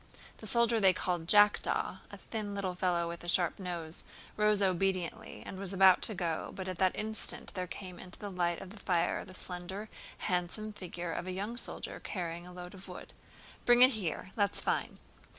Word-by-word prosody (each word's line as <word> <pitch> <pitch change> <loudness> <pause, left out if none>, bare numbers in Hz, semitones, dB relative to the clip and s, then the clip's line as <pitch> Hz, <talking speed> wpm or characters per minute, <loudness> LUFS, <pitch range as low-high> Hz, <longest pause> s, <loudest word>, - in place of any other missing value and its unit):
The 220 - -5
soldier 235 +1 +4
they 190 -3 +6
called 175 -3 -2
"Jackdaw," 205 +2 +4
a - - -9
thin 210 -3 -5
little 190 -2 -1
fellow 180 -2 +1
with 170 0 -6
a - - -6
sharp 175 +1 +2
nose, 170 -3 -4 0.3
rose 210 -1 +3
obediently 190 +2 0
and 190 - -7
was 195 -1 -4
about 190 -1 +7
to 215 - +1
go 170 -3 -2
but 190 -1 -5
at 185 -2 -4
that 185 -1 +3
instant 220 +2 -1
there 180 -1 -3
came 180 0 -7
into 180 - -9
the 205 -1 -6
light 175 -2 0
of 190 - -8
the 215 - -11
fire 175 -3 +1
the 185 - -11
slender, 190 +4 -5 0.3
handsome 185 +3 -1
figure 175 -3 -5
of 175 +2 -3
a - - -2
young 200 +5 -3
soldier 240 - -3
carrying 175 -2 -4
a - - -10
load 180 +1 -8
of 190 0 -11
wood. - - -9 0.5
"Bring 245 0 +7
it 255 - +8
here—that's 200 - 0
fine!" - - -1
185 Hz, 190 wpm, -32 LUFS, 175-205 Hz, 0.5 s, it